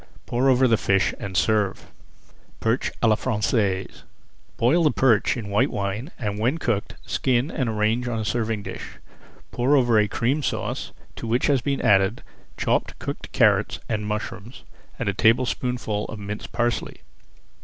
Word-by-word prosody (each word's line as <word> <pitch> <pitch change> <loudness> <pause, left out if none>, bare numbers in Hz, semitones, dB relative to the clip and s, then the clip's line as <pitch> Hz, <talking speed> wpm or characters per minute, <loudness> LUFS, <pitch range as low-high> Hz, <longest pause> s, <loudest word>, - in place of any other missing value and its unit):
Pour 125 +3 +1
over 130 0 +5
the 115 -2 +3
fish 95 -2 +2
and 95 -2 -4
serve. 105 -3 +1 0.7
PERCH 115 +4 0
À 115 - +5
LA 110 - +5
FRANÇAISE 105 -4 -1 0.6
Boil 140 +9 +3
the 155 - +5
perch 125 -4 +3
in 110 -4 -5
white 100 - +3
wine, 100 +7 -3
and 105 -4 -3
when 125 +8 +1
cooked, 120 -9 -2
skin 130 +3 0
and 130 -6 -1
arrange 110 +3 0
on 120 -2 -2
a 110 - -2
serving 110 -2 -1
dish. - - -7 0.6
Pour 130 +4 +2
over 120 -4 +4
a 105 - +3
Cream 125 +8 0
Sauce - - -3 0.2
to 115 - -6
which 120 +3 +1
has 140 -3 +3
been 140 +2 -1
added 95 -1 +3 0.3
chopped - - 0
cooked - - -6
carrots - - +3
and 105 -2 -2
mushrooms 105 +2 -5 0.3
and 125 - -3
a 100 - +1
tablespoonful 115 -1 +1
of 110 - -7
minced 105 +1 -6
parsley. 120 0 -2
115 Hz, 160 wpm, -24 LUFS, 105-125 Hz, 0.7 s, over